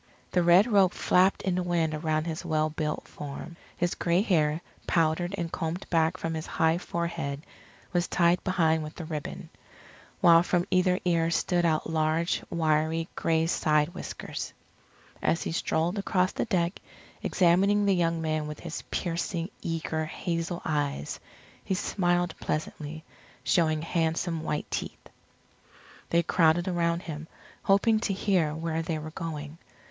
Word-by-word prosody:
The 180 Hz, -, +3 dB
red 175 Hz, +4 st, +6 dB
robe 200 Hz, -6 st, +4 dB
flapped 185 Hz, +2 st, +3 dB
in 190 Hz, -, +1 dB
the 180 Hz, -, 0 dB
wind 170 Hz, -3 st, 0 dB
around 155 Hz, 0 st, 0 dB
his 165 Hz, 0 st, -4 dB
well 155 Hz, -2 st, 0 dB
built 150 Hz, 0 st, -3 dB
form. 150 Hz, +3 st, -8 dB, 0.2 s
His 175 Hz, 0 st, 0 dB
gray 175 Hz, +3 st, +1 dB
hair, 155 Hz, -6 st, +2 dB, 0.3 s
powdered 170 Hz, +3 st, +1 dB
and 170 Hz, -2 st, -3 dB
combed 165 Hz, +3 st, -3 dB
back 160 Hz, -1 st, +2 dB
from 165 Hz, -, -3 dB
his 160 Hz, -1 st, -4 dB
high 160 Hz, +1 st, +2 dB
forehead, 170 Hz, -5 st, -3 dB, 0.5 s
was 175 Hz, -1 st, +1 dB
tied 170 Hz, 0 st, +3 dB
behind 160 Hz, -4 st, +2 dB
with 155 Hz, +2 st, -8 dB
a 165 Hz, -, -5 dB
ribbon. 155 Hz, -2 st, -5 dB, 0.7 s
While 165 Hz, -1 st, +7 dB
from 175 Hz, 0 st, +1 dB
either 185 Hz, 0 st, +3 dB
ear 165 Hz, -2 st, +2 dB
stood 175 Hz, +1 st, +1 dB
out 155 Hz, -1 st, 0 dB
large, 160 Hz, +1 st, +1 dB
wiry, 160 Hz, 0 st, +1 dB
gray 160 Hz, 0 st, +1 dB
side 150 Hz, -2 st, +2 dB
whiskers. -, -, -6 dB, 0.7 s
As 165 Hz, -, +1 dB
he -, -, -3 dB
strolled 165 Hz, +4 st, 0 dB
across 185 Hz, -2 st, +1 dB
the -, -, -2 dB
deck, 180 Hz, -5 st, 0 dB, 0.4 s
examining 195 Hz, +3 st, +3 dB
the 200 Hz, -, +4 dB
young 165 Hz, -2 st, +1 dB
men 155 Hz, -1 st, -1 dB
with 150 Hz, 0 st, -7 dB
his 165 Hz, -2 st, -5 dB
piercing, 170 Hz, +1 st, -2 dB
eager, 160 Hz, -1 st, -2 dB
hazel 170 Hz, +1 st, -3 dB
eyes, 145 Hz, -, -2 dB, 0.4 s
he 190 Hz, -, -1 dB
smiled 175 Hz, -2 st, 0 dB
pleasantly, 155 Hz, 0 st, -4 dB, 0.4 s
showing 155 Hz, +2 st, +2 dB
handsome 165 Hz, 0 st, 0 dB
white 150 Hz, -2 st, -2 dB
teeth. -, -, -5 dB, 1.0 s
They 170 Hz, 0 st, +3 dB
crowded 170 Hz, +1 st, +3 dB
around 170 Hz, -1 st, 0 dB
him, 155 Hz, -1 st, -6 dB, 0.3 s
hoping 215 Hz, +3 st, +3 dB
to 210 Hz, -2 st, -1 dB
hear 185 Hz, -6 st, +1 dB
where 160 Hz, 0 st, -2 dB
they 165 Hz, -1 st, -2 dB
were 155 Hz, +1 st, -6 dB
going. 155 Hz, -1 st, -6 dB
165 Hz, 150 wpm, -28 LUFS, 155-175 Hz, 1.0 s, While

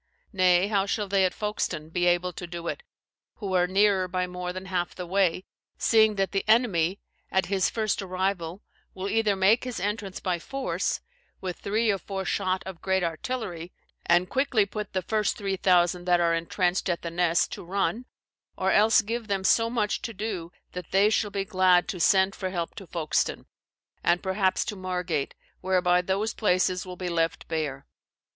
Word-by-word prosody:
Nay, 185 Hz, 0 st, +4 dB
how 200 Hz, -2 st, +1 dB
shall 205 Hz, 0 st, -1 dB
they 195 Hz, -1 st, +3 dB
at 185 Hz, -, +1 dB
Foulkstone 210 Hz, -7 st, -3 dB
be 175 Hz, +1 st, 0 dB
able 175 Hz, +1 st, +2 dB
to 175 Hz, -, -7 dB
do 170 Hz, 0 st, -6 dB
it, -, -, -3 dB, 0.5 s
who 200 Hz, -4 st, -5 dB
are 180 Hz, -1 st, +3 dB
nearer 195 Hz, 0 st, +3 dB
by 180 Hz, 0 st, -1 dB
more 180 Hz, 0 st, -5 dB
than 185 Hz, +1 st, -7 dB
half 180 Hz, -2 st, -2 dB
the 180 Hz, -, -5 dB
way? 185 Hz, 0 st, +1 dB, 0.3 s
seeing 220 Hz, -2 st, +4 dB
that 195 Hz, -1 st, 0 dB
the 195 Hz, -, 0 dB
enemy, 200 Hz, -6 st, +3 dB, 0.3 s
at 190 Hz, -1 st, +1 dB
his 190 Hz, -2 st, +2 dB
first 215 Hz, -2 st, -1 dB
arrival, 185 Hz, -1 st, -2 dB, 0.3 s
will 190 Hz, +1 st, -4 dB
either 215 Hz, -1 st, +2 dB
make 195 Hz, +5 st, +4 dB
his 250 Hz, -5 st, -4 dB
entrance 200 Hz, 0 st, -3 dB
by 180 Hz, -2 st, -1 dB
force, 270 Hz, +9 st, -2 dB, 0.4 s
with 185 Hz, -2 st, -5 dB
three 220 Hz, +2 st, +1 dB
or 195 Hz, -, -1 dB
four 190 Hz, 0 st, -5 dB
shot 185 Hz, +1 st, 0 dB
of 190 Hz, -3 st, -8 dB
great 190 Hz, -1 st, +1 dB
artillery, 175 Hz, -1 st, -4 dB, 0.4 s
and 175 Hz, +1 st, +4 dB
quickly 255 Hz, -3 st, +2 dB
put 210 Hz, 0 st, -6 dB
the 185 Hz, -1 st, -1 dB
first 215 Hz, +2 st, 0 dB
three 195 Hz, -2 st, -2 dB
thousand 180 Hz, -1 st, +2 dB
that 175 Hz, -1 st, +3 dB
are 170 Hz, -1 st, +3 dB
entrenched 175 Hz, +3 st, 0 dB
at 175 Hz, -, -1 dB
the 170 Hz, -, -4 dB
Nesse 170 Hz, 0 st, +2 dB
to -, -, -7 dB
run, 200 Hz, +6 st, -1 dB, 0.5 s
or -, -, +1 dB
else 220 Hz, +2 st, +5 dB
give 230 Hz, +1 st, -4 dB
them 195 Hz, -2 st, -1 dB
so 230 Hz, +4 st, +3 dB
much 220 Hz, -3 st, -1 dB
to 230 Hz, -, -6 dB
do 185 Hz, -5 st, -4 dB, 0.2 s
that 180 Hz, -3 st, -7 dB
they 200 Hz, +2 st, +4 dB
shall 215 Hz, -1 st, +1 dB
be 195 Hz, -1 st, -3 dB
glad 185 Hz, -2 st, +3 dB
to 180 Hz, -, -4 dB
send 190 Hz, +3 st, +4 dB
for 185 Hz, -, -4 dB
help 170 Hz, -3 st, -3 dB
to 195 Hz, -, -10 dB
Foulkstone, 160 Hz, -3 st, -1 dB, 0.6 s
and 175 Hz, +1 st, +2 dB
perhaps 190 Hz, 0 st, +1 dB
to 210 Hz, -, -4 dB
Margat, 180 Hz, -5 st, -2 dB, 0.2 s
whereby 180 Hz, -1 st, +2 dB
those 195 Hz, +4 st, -1 dB
places 185 Hz, -2 st, +1 dB
will 180 Hz, 0 st, -7 dB
be 180 Hz, -, -4 dB
left 165 Hz, -1 st, -1 dB
bare. 150 Hz, -4 st, -3 dB
190 Hz, 185 wpm, -27 LUFS, 175-205 Hz, 0.6 s, else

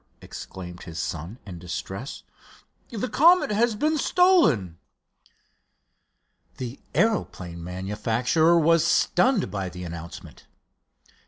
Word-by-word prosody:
exclaimed 90 Hz, -1 st, -9 dB
his 85 Hz, -3 st, -9 dB
son, 85 Hz, +6 st, -4 dB
in 90 Hz, -4 st, -8 dB
distress, 90 Hz, -, -6 dB, 0.7 s
"the 230 Hz, +1 st, -3 dB
Comet 340 Hz, 0 st, +4 dB
has 225 Hz, +2 st, +2 dB
been 305 Hz, +7 st, 0 dB
stolen!" 210 Hz, -, +3 dB, 1.8 s
The 125 Hz, +1 st, -6 dB, 0.2 s
aeroplane 90 Hz, -, -1 dB
manufacturer 115 Hz, -, +1 dB
was 165 Hz, 0 st, +4 dB
stunned 210 Hz, -, +2 dB
by 95 Hz, -2 st, -3 dB
the 90 Hz, 0 st, -8 dB
announcement. 85 Hz, -1 st, -9 dB
110 Hz, 95 wpm, -25 LUFS, -, 1.8 s, Comet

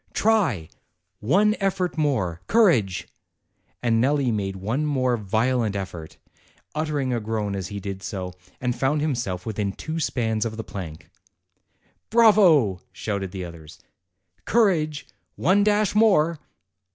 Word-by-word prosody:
Try 190 Hz, -, +2 dB, 0.5 s
one 200 Hz, -, +3 dB
effort 190 Hz, -3 st, -1 dB
more 115 Hz, -, 0 dB
courage!" 120 Hz, -, +3 dB, 0.8 s
And 115 Hz, -2 st, +2 dB
Nelli 140 Hz, -2 st, +2 dB
made 100 Hz, -2 st, -2 dB
one 110 Hz, +10 st, -2 dB
more 130 Hz, -4 st, +1 dB
violent 110 Hz, +1 st, 0 dB
effort, 90 Hz, -5 st, -6 dB, 0.6 s
utering 150 Hz, -4 st, -1 dB
a -, -, -1 dB
groan 105 Hz, -2 st, -2 dB
as 95 Hz, -2 st, -4 dB
he 100 Hz, -1 st, -6 dB
did 100 Hz, -1 st, -6 dB
so, 95 Hz, -2 st, -5 dB, 0.3 s
and 125 Hz, -1 st, -1 dB
found 135 Hz, +4 st, +1 dB
himself 120 Hz, -12 st, -2 dB
within 105 Hz, -3 st, -2 dB
two 160 Hz, +7 st, -5 dB
spans 110 Hz, -7 st, 0 dB
of 110 Hz, -1 st, -4 dB
the 110 Hz, -, -4 dB
plank. 85 Hz, -8 st, -8 dB, 1.0 s
"Bravo!" 180 Hz, -, +5 dB
shouted 100 Hz, -3 st, -4 dB
the 95 Hz, -1 st, -5 dB
others. 80 Hz, -3 st, -11 dB, 0.7 s
"Courage 165 Hz, -10 st, +1 dB, 0.3 s
one 195 Hz, +4 st, +3 dB
dash 210 Hz, -1 st, +2 dB
more!" 180 Hz, -7 st, +3 dB
120 Hz, 125 wpm, -24 LUFS, 100-160 Hz, 1.0 s, Bravo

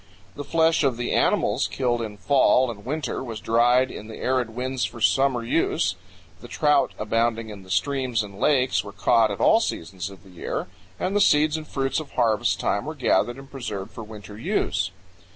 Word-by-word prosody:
The 145 Hz, -, -6 dB
flesh 160 Hz, +2 st, +2 dB
of 130 Hz, -4 st, +1 dB
the 120 Hz, -, -2 dB
animals -, -, +2 dB
killed 120 Hz, -3 st, -1 dB
in 105 Hz, -2 st, -6 dB
fall 125 Hz, +5 st, +3 dB
and 100 Hz, -3 st, -11 dB
winter 140 Hz, -1 st, -3 dB
was 115 Hz, -4 st, -6 dB
dried 120 Hz, +4 st, +3 dB
in 105 Hz, -, -8 dB
the 110 Hz, -, -9 dB
arid 130 Hz, -2 st, 0 dB
winds 130 Hz, +1 st, -2 dB
for 120 Hz, -, -4 dB
summer 130 Hz, +1 st, +2 dB
use; 115 Hz, -, +1 dB, 0.4 s
the -, -, -11 dB
trout 150 Hz, -2 st, +2 dB
abounding 115 Hz, +1 st, 0 dB
in 100 Hz, -2 st, -9 dB
the 95 Hz, -, -16 dB
streams 130 Hz, 0 st, 0 dB
and 100 Hz, -1 st, -10 dB
lakes 130 Hz, -3 st, +2 dB
were 100 Hz, -, -9 dB
caught 110 Hz, +3 st, +3 dB
at 100 Hz, -, -4 dB
all 220 Hz, -, +5 dB
seasons 90 Hz, -, -4 dB
of 95 Hz, 0 st, -14 dB
the 95 Hz, -, -16 dB
year; 90 Hz, -, -4 dB, 0.3 s
and 190 Hz, +2 st, -1 dB
the 205 Hz, -, +3 dB
seeds 150 Hz, -4 st, +4 dB
and 155 Hz, -1 st, -5 dB
fruits 135 Hz, +1 st, -1 dB
of 155 Hz, -3 st, -9 dB
harvest 115 Hz, -4 st, +1 dB
time -, -, 0 dB
were -, -, -5 dB
gathered 120 Hz, +1 st, +1 dB
and 135 Hz, 0 st, -12 dB
preserved 105 Hz, -8 st, -5 dB
for 115 Hz, -, -8 dB
winter 105 Hz, -1 st, -11 dB
use. -, -, 0 dB
120 Hz, 195 wpm, -24 LUFS, 110-135 Hz, 0.4 s, all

